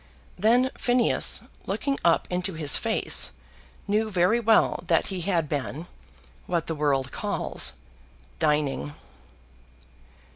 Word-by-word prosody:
Then 240 +7 +2
Phineas, 245 -1 +1 0.3
looking 275 -1 -2
up 170 -1 +3
into 180 +1 -1
his 150 -3 +4
face, 225 -1 +2 0.5
knew 215 +2 0
very 185 +4 +2
well 225 -5 +2
that 165 -1 +2
he 185 - -4
had 170 -3 0
been 145 +2 -4 0.6
what 170 -2 -1
the 165 - -3
world 140 -4 0
calls, - - -1 0.7
dining. 150 -2 0
175 Hz, 110 wpm, -25 LUFS, 150-220 Hz, 0.7 s, his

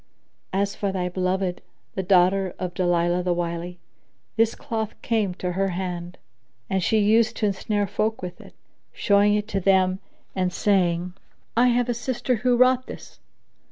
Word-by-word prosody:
As 200 +1 0
for 200 -1 -2
thy 180 -1 -2
beloved, 185 0 -1 0.3
the 190 - -2
daughter 185 0 +3
of 180 -1 -4
Dalilah 175 -1 +1
the 175 -1 +1
Wily, 170 +1 -4 0.6
this 225 0 +2
cloth 220 -5 -4
came 210 -6 0
to 180 0 -3
her 195 +2 0
hand, 180 -1 -4 0.5
and 190 0 +1
she 220 +5 +2
used 220 +2 +3
to 215 - 0
ensnare 205 +1 0
folk 215 +3 -1
with 180 -1 -7
it, - - -16 0.4
showing 205 0 +3
it 210 0 -1
to 195 - -1
them 190 0 +3 0.4
and 185 -1 0
saying, 180 -3 +1 0.4
'I 245 +2 +5
have 245 0 +2
a 240 - 0
sister 245 +1 -1
who 245 +2 +2
wrought 255 +1 +4
this.' - - -11
195 Hz, 160 wpm, -24 LUFS, 180-220 Hz, 0.6 s, I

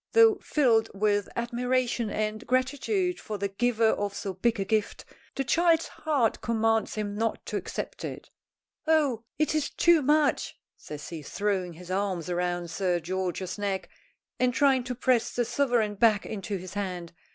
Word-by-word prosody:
Though 450 -3 +6
filled 230 -7 +2
with 205 0 +1
admiration 245 -1 0
and 215 +1 -3
gratitude 290 - 0
for 215 - -5
the 200 0 -2
giver 225 +2 +2
of 205 -2 -1
so 195 - -4
big 225 +4 0
a 195 - 0
gift, 215 +1 -1 0.3
the 270 - 0
child's 330 +5 +3
heart 285 -8 0
commands 225 -1 +1
him 210 -1 -3
not 225 +2 -2
to - - -5
accept - - -4
it. - - -7 0.6
"Oh, 285 -8 +2
it 305 0 +1
is 310 -2 0
too 340 -2 +4
much," 295 +1 +2 0.2
says 150 -1 -9
he, 165 -3 -6
throwing 185 +2 -2
his 180 +2 -10
arms 185 -3 -1
round 175 -1 -2
Sir 180 -1 0
George's 185 +2 -3
neck 195 -2 -2 0.5
and 250 0 +2
trying 270 -3 +4
to 250 -1 -3
press 250 -1 +1
the 240 - +1
sovereign 240 -3 +1
back 210 -1 +3
into 200 -1 -4
his 185 0 -9
hand. 180 -4 -4
220 Hz, 165 wpm, -28 LUFS, 195-255 Hz, 0.6 s, Though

